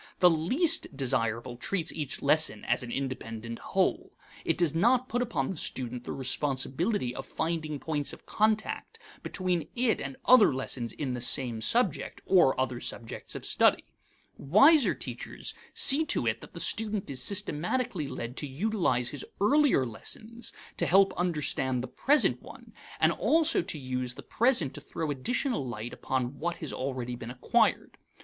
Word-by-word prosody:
The 180 -1 +6
least 250 - +1
desirable 120 -2 -1
treats 175 +5 -1
each 150 -4 -4
lesson 145 -7 +1
as - - +1
an 120 -1 -7
independent 115 -4 -5
whole. - - -1 0.3
It - - 0
does 170 -4 +2
not 245 +9 +3
put 245 0 -1
upon 205 - -1
the 185 - -6
student 125 -3 -4
the - - -5
responsibility 135 - -1
of 135 - -6
finding 155 0 -3
points 150 -2 -2
of - - -10
contact 215 0 -1 0.2
between 180 -3 -2
it 240 -2 +2
and 135 -1 -5
other 250 -5 +7
lessons 125 -2 -4
in 135 -4 -3
the 125 - -4
same 120 -2 +2
subject, 185 - +1
or 170 -9 +4
other 130 -2 -1
subjects 115 - -5
of - - -6
study. - - +3 0.6
Wiser 270 - +5
teachers - - -6 0.2
see 285 +4 +7
to - - 0
it - - -1
that - - -13
the - - -7
student 215 -3 -1
is 130 -2 -4
systematically 195 - -1
led 125 -2 -6
to 145 - -1
utilize 145 - 0
his 145 - -4 0.2
earlier 275 - +4
lessons 220 - -5 0.3
to - - 0
help 195 +2 +5
understand 150 -7 0
the - - -5
present 290 - +2
one, - - -13 0.3
and - - +4
also 325 0 +3
to 170 -2 -4
use 130 -2 -4
the 140 - -10
present 230 - +1
to 145 - -9
throw 155 +1 -4
additional 240 - -1
light 120 -2 -6
upon 130 +1 -3
what 175 +2 -2
has 155 - -5
already 130 -2 -4
been 120 -1 -8
acquired. 125 0 0
150 Hz, 160 wpm, -29 LUFS, 130-205 Hz, 0.6 s, other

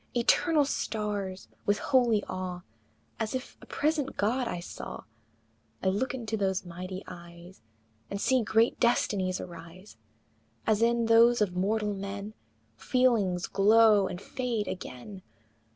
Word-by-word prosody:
Eternal 295 +5 +3
stars! 205 -7 -3 0.2
with 205 0 +3
holy 235 -5 +2
awe, 185 -1 -5 0.6
As 225 +2 -2
if 255 - -5
a - - -14
present 295 -2 -1
God 240 +5 +1
I 175 - -3
saw, 175 - -8 0.8
I 190 - +3
look 245 +7 -1
into 225 -3 -3
those 195 -2 -1
mighty 185 +2 -7
eyes 170 +1 -12 0.5
And 200 - -4
see 260 +4 +2
great 225 +2 +2
destinies 195 -6 +1
arise, 175 +3 -11 0.7
As 220 -1 +2
in 235 0 +3
those 230 +1 +5
of 200 -4 0
mortal 210 +3 0
men 200 +1 -6 0.4
Feelings 215 - +1
glow 210 0 +5
and 180 - -6
fade 235 -1 -3
again! 185 +3 -7
205 Hz, 130 wpm, -29 LUFS, 185-235 Hz, 0.8 s, those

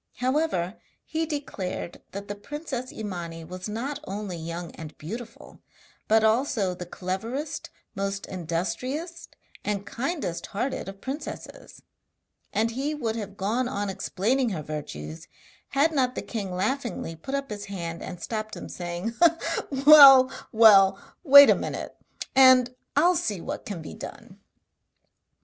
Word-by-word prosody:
However, 250 - -1 0.2
he 320 0 -2
declared 245 - -5
that 200 +1 -7
the 205 - -3
princess 255 +3 -6
Imani 175 -6 -6
was 185 +4 -7
not 265 +7 -4
only 200 -2 -5
young 170 +1 -6
and 160 -1 -10
beautiful, 230 +8 -9 0.5
but 220 0 +4
also 220 -4 +2
the 180 -1 -8
cleverest, 225 - -4 0.2
most 195 0 -3
industrious, 250 - -4 0.4
and 200 -1 -2
kindest 260 - -3
hearted 250 0 -3
of 195 0 -11
princesses; 285 +3 -7 0.7
and 225 +1 +1
he 275 +6 -2
would 230 -6 -2
have 205 -3 -6
gone 230 +6 0
on 205 -5 -2
explaining 225 +7 0
her 170 -7 -4
virtues 80 - -7 0.4
had 285 +4 +2
not 255 -4 +1
the - - -4
king 205 -5 -4
laughingly 210 -2 -2
put 265 - -5
up 275 -3 -3
his 205 -1 -5
hand 170 -4 -5
and 180 - -7
stopped 215 +1 -4
him - - -8
saying: 175 +5 -4 0.7
'Well, 275 -4 +10 0.2
well, 200 -4 +7 0.2
wait 280 -2 +10
a - - +5
minute, - - -5 0.4
and 260 -2 +7 0.2
I 290 +4 +4
will 360 +1 +5
see 205 - -1
what - - -6
can 180 -6 -5
be - - -8
done.' - - -10
215 Hz, 140 wpm, -26 LUFS, 185-265 Hz, 0.7 s, Well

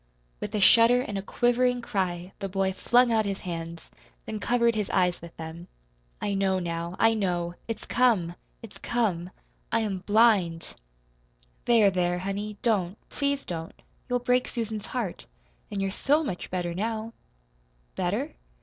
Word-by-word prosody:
With 210 +1 -4
a - - +1
shudder 230 +5 +6
and 210 -5 -5
a 195 - -1
quivering 245 +4 +2
cry 180 -4 -2
the 195 - -3
boy 190 0 0
flung 240 +5 +4
out 220 -1 +3
his 195 -1 -3
hands, 165 -2 -6 0.3
then 215 - -4
covered 235 +1 +2
his 210 -3 -2
eyes 180 -2 +1
with 170 0 -11
them. 165 +2 -8 0.5
"I 205 - -1
know, 195 -1 +2
now, 170 0 -3
I 225 0 +5
know! 175 -5 -1
It's 230 - -5
come 225 -9 +2 0.3
it's 225 - -11
come! 190 -8 0 0.4
I 230 - +2
am 200 -4 -2
BLIND!" 200 -5 +3 0.9
"There, 225 -4 +5
there, 180 -1 +1
honey, 200 +3 -4
don't, 205 -5 +1
please 280 -1 -1
don't. 165 -2 -6 0.3
You'll 245 - +2
break 250 +1 +1
Susan's 220 -3 -4
heart. 230 -8 -4 0.4
An' 200 - -4
you're 195 0 0
SO 295 +9 +2
much 185 - -4
better 175 -2 -2
now." 220 +4 -3 0.8
"Better?" - - -1
200 Hz, 155 wpm, -27 LUFS, 180-230 Hz, 0.9 s, shudder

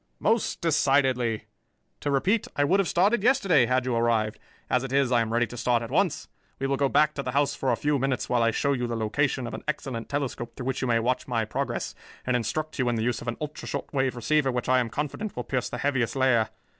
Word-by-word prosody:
"Most 225 +1 +1
decidedly. 135 -7 +2 0.5
To 145 - -2
repeat, 185 +11 +1
I 145 - +2
would 185 +7 +3
have 195 - +2
started 200 +7 +3
yesterday, 195 - +4
had 125 0 +1
you 125 -2 0
arrived. 115 -2 +1 0.3
As 125 0 +1
it 135 - -5
is, 135 -2 +2
I 120 -2 +4
am 110 -1 -2
ready 120 +1 +2
to 120 - -10
start 120 0 +1
at 115 - -7
once. 165 +2 +1 0.3
We 135 - -3
will 135 0 +1
go 140 0 +1
back 150 +2 +3
to 140 - -3
the 125 -2 -4
house 140 0 +2
for 135 - -1
a - - +3
few 145 -1 0
minutes 130 -3 -1
while 125 -1 +1
I 115 - +4
show 140 +5 +1
you 125 -2 -1
the 120 - -3
location 125 +4 0
of 115 - -6
an - - -6
excellent 135 -6 -3
telescope 135 -4 -3
through 125 - -6
which 130 -1 -2
you 130 - 0
may 115 -1 +3
watch 125 +3 0
my 115 -3 0
progress, - - -3 0.3
and 125 - +1
instruct 150 +7 -2
you 125 -1 +2
in 120 - 0
the 110 - -1
use 120 -1 -1
of - - -9
an 120 - -2
ultra 150 -1 -6
short - - -5
wave 130 -2 +1
receiver 135 +3 +1
which 125 -1 -3
I 130 0 +4
am 120 -2 -1
confident 150 - -4
will 125 - -3
pierce 130 -1 -2
the - - -5
Heaviside 135 -2 0
layer. 120 -4 +3
130 Hz, 255 wpm, -26 LUFS, 120-145 Hz, 0.5 s, yesterday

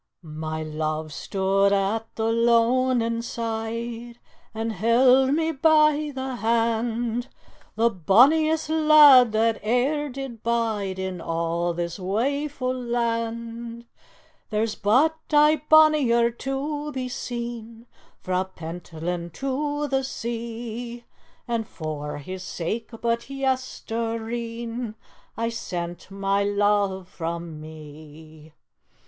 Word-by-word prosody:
"My 155 0 -5
love 155 0 -3
stood 195 +2 +1
at 200 +3 -1
the 225 0 0
loanin' 230 0 +2
side 230 +1 -4 0.3
And 225 0 -3
held 250 +6 +4
me 325 0 +1
by 305 0 +3
the 260 -1 -4
hand, 230 +1 0 0.5
The 230 +1 +3
bonniest 285 - +4
lad 300 -6 +7
that 225 0 +1
e'er 270 +7 +1
did 260 -4 -7
bide 220 -5 -1
In 190 -2 -4
a' 170 +1 -1
this 170 +1 -3
waefu' 255 +7 -1
land; 235 -1 -3 0.6
There's 215 0 0
but 290 +10 +2
ae 300 0 +5
bonnier 290 -7 +5
to 285 +4 -4
be 260 -2 -3
seen 235 -2 -6 0.4
Frae 185 0 0
Pentland 170 0 -5
to 290 - -2
the 270 -1 0
sea, 235 -1 -5 0.4
And 230 -3 -2
for 150 -3 -5
his 185 +6 -7
sake 185 +7 -4
but 235 +1 -1
yestereen 235 -3 -3 0.4
I 230 0 0
sent 175 -7 -5
my 195 0 0
love 200 -2 +1
frae 170 -1 -4
me. 155 -1 -11
230 Hz, 100 wpm, -24 LUFS, 190-255 Hz, 0.6 s, lad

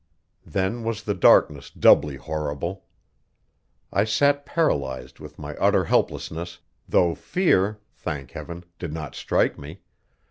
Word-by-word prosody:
Then 100 +5 -1
was 110 -1 -3
the 105 - -1
darkness 75 -5 +4
doubly 75 -1 +4
horrible. 75 +5 -4 1.1
I 100 - +3
sat 145 +6 +2
paralyzed 65 - -1
with - - -11
my - - -7
utter - - +3
helplessness, 85 +2 -1 0.3
though 85 -2 +3
fear, 105 - +1 0.2
thank 70 -6 -6
Heaven, 85 +1 -8 0.2
did 85 -4 -5
not 80 -3 -6
strike - - 0
me! 75 +7 -10
85 Hz, 120 wpm, -24 LUFS, 75-105 Hz, 1.1 s, darkness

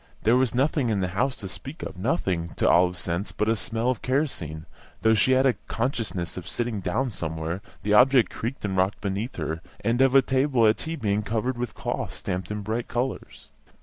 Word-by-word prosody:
There 115 +3 +5
was 130 -1 +2
nothing 135 -1 +2
in 105 -3 +1
the 90 -1 0
house 130 +9 0
to 100 - -6
speak 135 - -7
of; - - -5
nothing, 90 - -1
to - - +1
Olive's 90 +1 +4
sense, 85 +4 -2
but 105 - -1
a 115 - +3
smell 115 +3 -1
of 125 - -4
kerosene; 110 - -2 0.4
though 110 0 +5
she 110 +4 +4
had 130 +1 +4
a 130 - +5
consciousness 110 - -2
of 90 0 -6
sitting 120 -3 -2
down 115 +8 -1
somewhere 85 0 -4 0.2
the 105 - +1
object 125 +1 +6
creaked 115 0 -4
and 95 -2 -1
rocked 95 +2 +1
beneath 100 +5 -3
her 80 0 -3 0.2
and 120 +2 +1
of 135 -1 +5
the 135 -1 +7
table 130 -2 +2
at 110 0 +4
tea 160 +1 -4
being 105 -6 0
covered 115 +4 -1
with 125 -1 -1
a - - -21
cloth - - -3
stamped 90 0 -4
in 105 0 -3
bright 110 +3 -2
colours. 125 +2 -4
110 Hz, 215 wpm, -26 LUFS, 95-130 Hz, 0.4 s, the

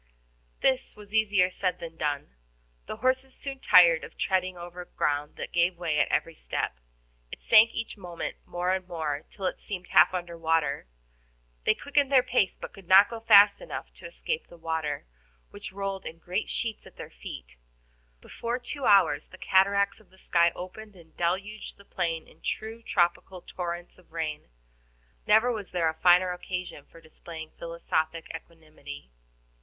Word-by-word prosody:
This 265 0 +1
was 210 0 -14
easier 205 -4 +3
said 185 0 -1
than 165 -1 -8
done. 145 - -2 0.5
The - - -4
horses 260 +1 0
soon 275 -1 -6
tired 170 -8 +6
of - - -10
treading 185 -1 0
over 175 +1 -8
ground 145 -3 -1
that - - -6
gave 175 +1 +2
way 165 -4 0
at - - +3
every - - 0
step. - - -3 0.5
It - - -9
sank 225 0 +7
each 230 -1 -5
moment 175 -3 -6
more 180 +1 -1
and 185 -1 -3
more, 155 -4 -3
till 195 - -7
it - - -1
seemed 185 -3 -7
half - - +6
under 175 -2 -4
water. 160 - 0 0.8
They - - +4
quickened 285 -1 +1
their 260 -2 +6
pace, 250 -7 +1
but - - -8
could 195 -3 -14
not 195 +4 +7
go 230 - -5
fast 205 -2 +7
enough - - -7
to - - -10
escape 480 -1 -4
the 170 - -15
water, 160 -3 -3 0.5
which - - -8
rolled 195 0 -4
in 165 - -8
great 180 +5 -3
sheets 225 -2 -3
at - - -16
their - - -9
feet. - - -10 0.6
Before 235 +1 -4
two 255 +2 -6
hours 175 -7 +5
the - - -14
cataracts 200 +2 +3
of 215 - -23
the 190 - -22
sky 170 -2 +3
opened 205 +3 -9
and 165 -3 -18
deluged 195 +5 -2
the 200 - -17
plain 165 -4 -2
in - - -21
true 225 +1 -4
tropical 180 -3 0
torrents 175 0 -6
of 180 - -23
rain. 155 - -4 0.8
Never 220 +4 +5
was 210 -5 -5
there 170 -3 +1
a - - -3
finer 180 +2 +5
occasion 180 -4 -5
for 165 - -17
displaying 160 0 -10
philosophic 165 -1 -2
equanimity. 155 - -11
180 Hz, 170 wpm, -28 LUFS, 165-205 Hz, 0.8 s, sank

